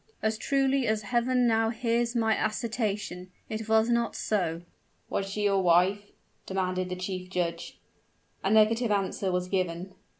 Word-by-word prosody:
"As 220 0 0
truly 270 -1 +1
as 215 0 0
Heaven 245 +3 +1
now 225 -1 +3
hears 235 +1 0
my 225 -2 +2
assertion, 215 -4 -2 0.2
it 220 0 -5
was 220 0 +4
not 235 -1 +1
so!" 175 -5 -1 0.5
"Was 195 - -1
she 210 +1 -3
your 200 -1 +3
wife?" 185 +4 +3 0.4
demanded 185 -1 -1
the 180 - -3
chief 185 0 -5
judge. 170 -2 -3 0.7
A 195 - +1
negative 220 +2 +4
answer 195 -1 0
was 180 0 -1
given. 185 -1 -2
210 Hz, 145 wpm, -28 LUFS, 185-230 Hz, 0.7 s, was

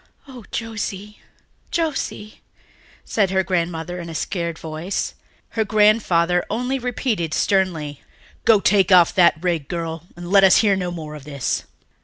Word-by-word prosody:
"Oh, 250 -5 -11
Josie, 210 -2 -5 0.5
Josie," 290 -9 -3 0.6
said 200 -4 +1
her 190 0 +1
grandmother 175 -1 -2
in 170 -1 -7
a 165 - -7
scared 170 -1 -3
voice. 160 +4 -4 0.4
Her 225 -1 0
grandfather 200 -5 +3
only 250 +4 -1
repeated 230 - -2
sternly, 165 -7 0 0.4
"Go, 220 -3 +5
take 195 -2 +3
that 175 -1 +5
rig 175 -3 0
off, - - -39
girl, 165 -1 -4
and 175 +1 -8
let 195 -1 +6
us 190 - +7
hear 200 -2 +4
no 180 -2 -2
more 160 -3 -7
of 150 -2 -9
this." 140 -3 -2
185 Hz, 145 wpm, -21 LUFS, 170-210 Hz, 0.6 s, us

